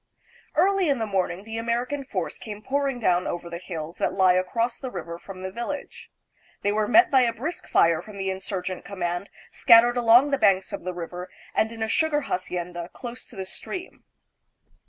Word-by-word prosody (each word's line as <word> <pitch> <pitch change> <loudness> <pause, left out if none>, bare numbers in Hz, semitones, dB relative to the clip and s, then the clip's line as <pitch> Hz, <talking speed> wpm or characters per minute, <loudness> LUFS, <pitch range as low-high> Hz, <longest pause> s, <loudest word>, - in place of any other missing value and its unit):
Early 390 -3 +3
in 275 - +2
the 225 - -1
morning 190 -2 -1
the 225 +1 -5
American 240 +5 -1
force 195 -10 -4
came 210 -1 -8
pouring 275 -1 0
down 180 -5 +2
over 175 0 -4
the 170 - -5
hills 165 -2 -6
that - - +1
lie 190 -2 +5
across 230 +6 0
the 260 - -5
river 170 -5 -6
from 185 0 -10
the 190 - -4
vil 235 +4 -4
lage. 290 -1 -6 0.5
They 205 - +2
were 210 0 +1
met 355 +9 +6
by 265 -2 +6
a 240 -2 +3
brisk 305 +10 -5
fire 165 -1 +4
from 210 -2 -11
the 195 -1 -1
insurgent 190 -1 -4
command 175 0 -3 0.2
scattered 240 +1 +6
along 240 +4 +6
the 275 - +1
banks 195 -2 +3
of 200 - -4
the 185 - -2
river 180 +1 -6 0.2
and 220 - +1
in 225 -1 -4
a - - 0
sugar 300 +4 +2
hacienda 180 -6 -4
close 245 -1 -7
to - - -15
the 190 - -4
stream. 365 - -7
210 Hz, 200 wpm, -25 LUFS, 180-245 Hz, 0.5 s, met